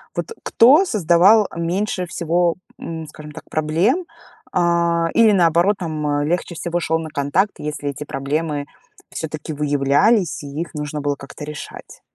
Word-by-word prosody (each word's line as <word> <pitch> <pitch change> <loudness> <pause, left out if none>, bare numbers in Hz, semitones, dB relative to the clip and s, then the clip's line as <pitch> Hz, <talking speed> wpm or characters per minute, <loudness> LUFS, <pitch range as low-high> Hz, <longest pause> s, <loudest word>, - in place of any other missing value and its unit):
Вот - - -2 0.2
кто 285 +11 +5
создавал 200 - +4
меньше 180 +3 -1
всего, 170 0 0 0.2
м, 160 -1 -6
скажем 150 0 -11
так, - - -10
проблем, 170 - +1 0.5
э, 180 - +2 0.5
или, 225 -2 +5
наоборот, 175 +2 +3
там, 155 -4 -3
а, 145 0 0
легче 175 +2 -2
всего 170 +1 -2
шёл 160 -1 0
на 160 -1 -6
контакт, 145 +9 0
если 150 -1 -4
эти 140 +1 -6
проблемы 145 +1 -2 0.5
всё-таки 155 -1 -5
выявлялись 150 - +2
и 145 - -7
их 170 - -6
нужно 150 0 -4
было 145 0 -1
как-то 140 +1 -10
решать? 150 0 -9
160 Hz, 150 wpm, -20 LUFS, 150-180 Hz, 0.5 s, кто